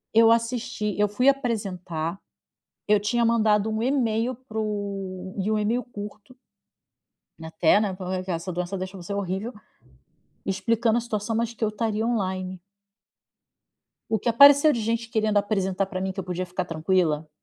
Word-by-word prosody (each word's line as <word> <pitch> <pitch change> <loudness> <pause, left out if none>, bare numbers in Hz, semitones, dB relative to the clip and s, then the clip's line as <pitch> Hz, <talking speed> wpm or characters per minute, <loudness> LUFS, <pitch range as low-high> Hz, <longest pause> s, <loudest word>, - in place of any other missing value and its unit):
Eu 225 0 +7
assisti 230 -3 0
Eu 210 0 +2
fui 250 +6 +1
apresentar, 195 -10 -1 0.7
eu 210 0 +5
tinha 235 +3 +1
mandado 220 -1 +2
email 240 -1 +1
para 230 -3 -8
o 195 -3 -4
e 195 +2 -1
um - - +2
email 220 +4 0
curto 210 +1 -9 1.1
até, 160 +3 +3
né, 205 -3 -1
porque 185 0 -4
essa 170 +2 -3
doença 180 +2 -3
deixou 190 0 -6
você 175 +4 -5
horrível, 200 +4 -3 0.9
explicando 225 +4 +1
a - - 0
situação, 225 -1 -3
mais 230 0 -1
que 225 - -2
eu - - +2
estaria 220 0 -1
online. 185 -5 -2 1.5
O 220 - +1
que 235 - 0
apareceu 285 +5 +8
de 240 - -1
gente 230 +1 -1
querendo 215 -2 +1
apresentar 195 -2 0
pra 185 -1 -4
mim, 190 0 -2
que 195 - -7
eu 190 - -3
podia 180 0 -3
ficar 180 +1 -3
tranquila. 160 -2 0
210 Hz, 155 wpm, -25 LUFS, 185-230 Hz, 1.5 s, apareceu